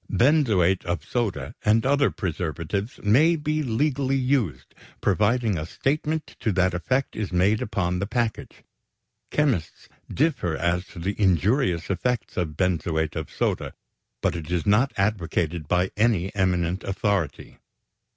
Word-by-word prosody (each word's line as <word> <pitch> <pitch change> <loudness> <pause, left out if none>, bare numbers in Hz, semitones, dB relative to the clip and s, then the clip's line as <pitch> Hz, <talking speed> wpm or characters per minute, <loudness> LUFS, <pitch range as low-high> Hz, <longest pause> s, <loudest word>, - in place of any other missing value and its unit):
Benzoate 115 - +3
of 85 -4 -3
soda 100 - -2
and 110 +2 +3
other 140 +1 +3
preservatives 90 - -3
may 145 +11 +5
be 155 0 -1
legally 135 +1 0
used, 125 - -1 0.3
provided 110 0 +2
a 75 - -4
statement 155 - -2
to 110 - 0
that 90 0 +2
effect 130 +10 -1
is 105 -3 -3
made 95 +5 +2
upon 90 -3 -1
the 100 - -2
package. 115 0 -3 0.7
Chemists 135 - -1 0.2
differ 125 - 0
as 90 +2 0
to - - -15
the 95 +4 -2
injurious 95 - +2
effect 120 +5 -2
of 80 -5 -2
benzoate 80 -4 0
of 80 - -4
soda, - - -2 0.5
but - - +1
it 80 -2 -6
is 90 -2 -1
not 110 +7 +3
advocated 85 -5 -1
by 90 +2 +1
any 105 -4 +1
eminent 90 -2 0
authority. 100 -4 -2
100 Hz, 135 wpm, -25 LUFS, 85-125 Hz, 0.7 s, may